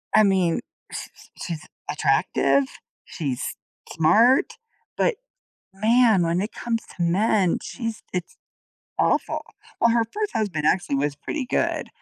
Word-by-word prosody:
I 215 - +7
mean, 190 -4 +2 0.3
sh - - -5
sh - - -17
she's 165 -3 -5 0.2
attractive, 140 0 +2 0.4
she's 135 -6 -3 0.4
smart, 225 +11 +4 0.4
but, - - +2 0.6
man, 220 -1 +4
when 170 +1 +1
it 210 +3 -3
comes 230 -1 -2
to - - -15
men, 185 +1 +2
she's 230 -3 -5
it's 180 -2 -4 0.6
awful. - - +1 0.4
Well, 235 - +5
her 230 0 +3
1st 425 -1 -2
husband 190 -10 -1
actually 175 -4 +2
was 145 +1 -1
pretty 280 - -4
good, - - 0
195 Hz, 130 wpm, -24 LUFS, 165-230 Hz, 0.6 s, I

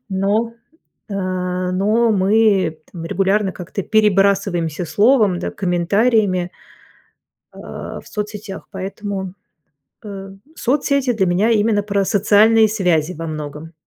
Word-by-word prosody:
Но, 205 +4 0 0.6
а 185 -1 -2
но 215 +5 +2
мы 195 -4 +2
там 165 -2 -7
регулярно, 195 +3 0
как 180 -1 -10
ты, 200 - -2
перебрасываемся 195 -5 +1
словом, 210 - +3
да, - - -4
комментариями 185 +1 +1 1.0
а, - - -8
в - - -17
соцсетях. 210 -1 -6
Поэтому, 195 -1 -5 0.7
э, 195 -2 -8 0.2
соцсети 275 0 0
для 205 -4 +1
меня 185 +6 +2
именно 210 -1 +2
про 200 -1 0
социальные 215 +2 +4
связи 180 -6 0
во 165 0 -6
многом. 155 +1 -7
195 Hz, 110 wpm, -19 LUFS, 180-215 Hz, 1.0 s, социальные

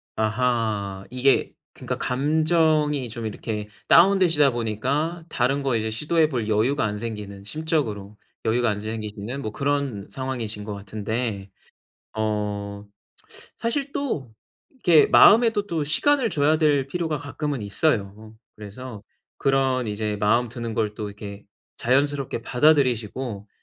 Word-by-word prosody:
아하. 110 -4 -1
이게 130 +2 +2 0.2
그러니까 - - -5
감정이 150 0 +1
좀 115 0 -6
이렇게 105 -1 -4 0.2
다운되시다 170 -5 +5
보니까 130 +9 -2
다른 135 +2 0
거 135 -3 +1
이제 110 0 -2
시도해 155 +8 +1
볼 120 -6 -2
여유가 115 +7 +2
안 105 0 -2
생기는, 105 -3 -6
심적으로 110 -7 -2 0.3
여유가 120 +1 +2
안 105 -1 -2
생기시는 110 +3 -5
뭐 110 - -4
그런 140 -5 -2
상황이신 120 -6 -4
것 105 0 -5
같은데 105 +1 -4 0.7
어 105 -1 -2 0.7
사실 275 +4 -2
또 160 - -3 0.4
이렇게 175 - +4
마음에도 220 -2 +6
또 165 -5 -2
시간을 255 - +2
줘야 150 +2 +2
될 145 -4 +2
필요가 160 +1 -2
가끔은 145 -2 -4
있어요. 105 -1 -1 0.2
그래서 105 +1 -9 0.4
그런 135 -2 +1
이제 105 0 -2
마음 115 +4 +2
드는 115 -1 -5
걸 105 -1 -1
또 105 0 -5
이렇게 100 0 -9 0.3
자연스럽게 135 0 0
받아들이시고 125 -6 +1
120 Hz, 295 characters per minute, -24 LUFS, 105-145 Hz, 0.7 s, 마음에도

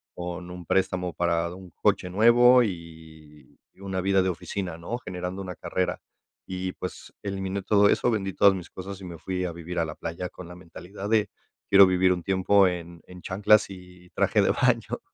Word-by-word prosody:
con 90 0 -6
un 90 -1 -9
préstamo 90 -1 0
para 85 0 0
un 95 -1 -12
coche 90 - 0
nuevo 120 +5 +6
y 80 - -9 0.2
y - - -27
una 95 -1 -3
vida 95 0 +2
de 95 - 0
oficina, 90 0 -4
¿no? 115 +8 -4
Generando 90 -4 -6
una 90 -1 -7
carrera. 90 - -2 0.5
Y, 95 0 -3
pues, - - -8
eliminé 95 0 -3
todo 100 +1 +4
eso, 125 - +2
vendí 95 -4 -1
todas 100 +1 +5
mis 90 -2 -8
cosas 95 +1 -8
y 95 - -8
me 85 -2 -9
fui 90 +1 -3
a 90 - -3
vivir 85 +1 -7
a 85 - +1
la 75 - -6
playa 85 +2 -5
con 90 -2 -11
la 90 - -10
mentalidad 90 +3 -9
de: 110 -2 +2 0.4
"Quiero 100 0 +8
vivir 95 0 +3
un 90 -2 -5
tiempo 95 +1 +3
en 85 -1 -5
en 90 -1 -12
chanclas 100 +4 +3
y 90 -2 -13
traje - - +2
de - - +2
baño". - - +1
90 Hz, 195 wpm, -26 LUFS, 90-95 Hz, 0.5 s, Quiero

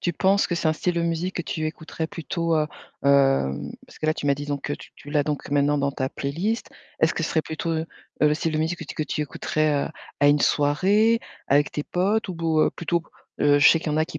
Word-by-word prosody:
tu 175 - 0
penses 195 +4 +2
que 175 - -1
c'est 165 - -1
un 155 - +4
style 175 +3 -1
de 170 - 0
musique 170 +2 -2
que 175 - -1
tu 155 -1 -3
écouterais 160 +1 -4
plutôt, 165 +1 -1
heu, 150 - +2 0.4
hem, 135 - +3 0.2
parce - - -16
que, 155 - -1
là, 155 - +4
tu - - -4
m'as 140 - +4
dit 145 +1 -6
donc 145 -1 -3
que 145 - -3
tu - - -8
tu 145 - -11
l'as 145 -1 +2
donc 150 -1 -3
maintenant, 145 +1 +3
dans 140 0 0
ta 130 -1 -2
playlist. 175 - -2 0.3
Est-ce - - +3
que - - -2
ce - - -1
serait 160 - +1
plutôt, 160 +2 -4
heu, 160 0 -1 0.3
le 150 0 +4
style 165 +1 -1
de 155 - 0
musique 160 +3 -1
que - - -5
tu - - -8
que 155 - 0
tu 150 - -3
écouterais, 150 0 0
heu, - - -5 0.3
à 145 - +4
une 145 0 +4
soirée 200 +13 +3 0.3
avec 145 +2 +3
tes 150 - -4
potes? 200 +5 0
Ou 185 - -4
bo 160 -2 +2
plutôt, 170 0 -1 0.4
heu, 145 0 +4
je 145 - +8
sais 165 - +5
qu'il 155 -1 -3
y - - 0
en - - 0
a 155 - +3
qui 160 -2 -7
155 Hz, 265 wpm, -24 LUFS, 145-170 Hz, 0.4 s, je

